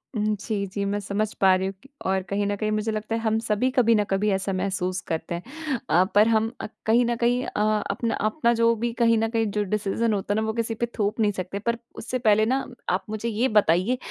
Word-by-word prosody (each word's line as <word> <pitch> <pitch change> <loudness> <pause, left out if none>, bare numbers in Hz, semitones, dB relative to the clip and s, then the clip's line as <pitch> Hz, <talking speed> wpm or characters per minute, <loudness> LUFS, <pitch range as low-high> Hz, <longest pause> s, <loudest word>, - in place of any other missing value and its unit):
उम, 215 0 +1
जी, 205 -1 -2
जी। 200 +1 -3
मैं 200 +1 -1
समझ 205 +2 -2
पा 190 -1 +6
रही 190 +1 -1
हूँ 195 - -4
कि 270 - -17 0.2
और 190 0 +1
कहीं 200 +1 0
न 205 - 0
कहीं 215 +1 -2
मुझे 215 +1 0
लगता 215 +1 -3
है 225 - -2
हम 220 -1 +1
सभी 225 +2 0
कभी 235 -3 +4
ना 210 - +3
कभी 195 +2 +2
ऐसा 195 0 -1
महसूस 185 -1 -1
करते 165 +1 -3
हैं। 280 - -4
अ, 175 +3 +5
पर 210 +2 +6
हम 225 0 +2
अ, - - -4 0.2
कहीं 235 +2 +4
न 240 0 0
कहीं 245 +2 +1
अ 210 - -1 0.3
अपना 230 +3 -1
अपना 235 +3 +1
जो 230 0 +3
भी 235 +2 -2
कहीं 230 -1 +3
न 225 0 +1
कहीं 225 -1 +1
जो 210 +1 0
डिसिजन 210 +3 0
होता 200 0 -1
है 210 - +1
ना - - -1
वो 220 - -1
किसी 230 0 -2
पे 235 - -1
थोप 210 0 0
नहीं 210 -2 +3
सकते 190 0 -5
पर 235 +3 -1 0.2
उससे 255 +2 -4
पहले 215 -2 +4
ना 265 +4 0 0.2
आप 185 +1 0
मुझे 215 +2 -3
ये 230 +4 +1
बताइए 200 +5 +3
215 Hz, 250 wpm, -25 LUFS, 200-230 Hz, 0.3 s, पा